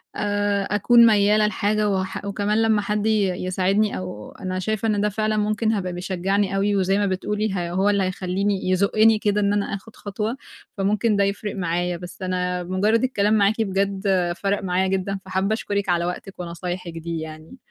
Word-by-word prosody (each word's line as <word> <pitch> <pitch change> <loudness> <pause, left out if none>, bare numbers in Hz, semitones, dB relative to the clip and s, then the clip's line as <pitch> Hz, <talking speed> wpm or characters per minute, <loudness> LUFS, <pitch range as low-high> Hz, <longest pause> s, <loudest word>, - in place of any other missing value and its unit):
آآ، 205 -1 0
أكون 235 +3 +6
مايِّلة 210 -1 +4
لحاجة 210 0 0
واح 190 0 -2
وكمان 205 +2 0
لمّا 220 -2 +3
حد 210 +1 -1
ي 215 -3 +3 0.2
يساعدني، 195 +3 +1
أو 185 0 -7
أنا 185 0 -4
شايفة 215 +3 -1
إن 210 -2 +1
ده 210 - +2
فعلًا 215 +1 -1
ممكن 215 +1 +1
هيبقى 185 -3 -2
بيشجِّعني 190 +2 -1
أوي، 200 +1 +1
وزيّ 195 0 +2
ما 205 - +1
بتقولي، 210 +3 -1
ه 175 -2 -2
هو 190 +3 +2
اللي 200 -1 +2
هيخلِّيني 185 +1 -1
يزُقِّني 215 +3 +4
كده، 210 0 +1
إن 200 0 +2
أنا 205 -1 +1
آخُد 220 +3 -12
خطوة. 210 +5 -4 0.4
فممكن 210 +3 +1
ده 200 - +3
يفرِّق 200 +1 -2
معايا. 175 -1 -1
بس 180 +2 -10
أنا 180 -1 -1
مُجرَّد 205 +6 +1
الكلام 210 -5 +1
معاكِ، 215 +1 +3
بجد 195 0 -1 0.3
فرِّق 200 0 -1
معايا 185 0 +1
جدًا. 195 +1 -1
فحابَّة 190 +2 0
أشكرِك 200 -3 -2
على 170 -1 +2
وقتِك 180 +2 -6
ونصايحِك 175 0 -5
دي 165 0 -4
يعني. 155 +8 -9
200 Hz, 180 wpm, -23 LUFS, 185-210 Hz, 0.4 s, أكون